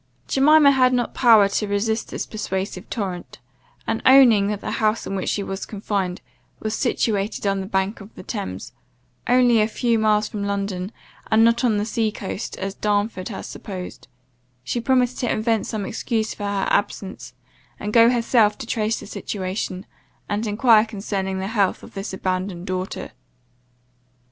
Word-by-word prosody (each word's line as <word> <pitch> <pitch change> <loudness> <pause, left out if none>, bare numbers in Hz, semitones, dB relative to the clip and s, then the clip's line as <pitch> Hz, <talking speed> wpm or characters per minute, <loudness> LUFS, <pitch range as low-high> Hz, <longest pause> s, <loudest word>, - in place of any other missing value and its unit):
Jemima 290 +1 +6
had 255 -2 +4
not 245 -2 0
power 225 -5 +6
to 200 +1 -1
resist 220 +2 -1
this - - -4
persuasive 190 -2 -4
torrent; 190 -6 -5 0.5
and, - - -1
owning 250 -6 +7
that 210 -1 -2
the - - -4
house 215 +1 +1
in 195 - -4
which 190 - -2
she 205 - -1
was 195 0 -5
confined, 195 -3 -3 0.4
was 215 0 -3
situated 215 -4 -1
on 195 -1 +1
the 190 - -6
banks 195 +1 -1
of 200 +3 -13
the - - -10
Thames, 205 -4 -6 0.5
only 245 -2 +5
a 215 - +3
few 230 0 0
miles 215 -1 +2
from 210 -2 -5
London, 200 -1 -3 0.4
and 220 0 +5
not 230 +1 +3
on 225 -4 +3
the 205 - 0
sea 220 -1 0
coast, 200 +1 -6
as 195 0 -4
Darnford 205 -1 -1
had 200 - -6
supposed, 185 -3 -8 0.6
she 240 - -2
promised 250 0 +1
to 245 - 0
invent 225 0 0
some 215 -3 -3
excuse 220 0 -2
for 205 - -6
her 200 -1 -1
absence, 195 -1 -2 0.4
and 210 0 -4
go 230 0 +7
herself 230 -3 +3
to 265 - -7
trace 220 -1 -1
the - - -9
situation, 185 -2 -4 0.4
and 210 +2 -2
enquire 215 +1 +5
concerning 195 -3 -3
the 190 - -3
health, 200 -2 0
of - - -12
this 195 0 -5
abandoned 185 -1 -3
daughter. 185 0 -4
210 Hz, 170 wpm, -22 LUFS, 195-230 Hz, 0.6 s, owning